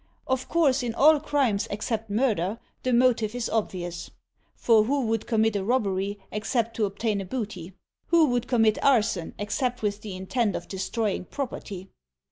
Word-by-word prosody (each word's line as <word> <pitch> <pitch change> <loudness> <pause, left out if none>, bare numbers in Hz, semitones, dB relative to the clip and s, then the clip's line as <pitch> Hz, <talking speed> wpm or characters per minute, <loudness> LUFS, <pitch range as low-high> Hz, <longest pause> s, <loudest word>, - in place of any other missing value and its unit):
Of 260 -1 -2
course 285 -5 +3
in 235 -2 -3
all 305 +2 +6
crimes 275 -9 0
except 220 +1 -3
murder, 210 -3 0 0.2
the 255 - -1
motive 235 -2 +3
is 245 -2 -2
obvious; 175 -5 -3 0.5
for 220 -2 +4
who 275 +1 0
would 225 -1 -1
commit 220 -2 +2
a 200 - 0
robbery 200 -3 0
except 225 +2 -1
to 220 - +2
obtain 205 +1 -1
the 195 - -4
booty? 195 -5 -5 0.3
Who 335 -2 +5
would 245 -1 0
commit 225 -4 +2
arson 220 -10 +2
except 245 +4 -2
with 205 0 -1
the 205 -3 -6
intent 200 +3 -1
of 170 - -5
destrojdng 195 0 -2
property? 205 -8 -5
220 Hz, 160 wpm, -26 LUFS, 200-250 Hz, 0.5 s, all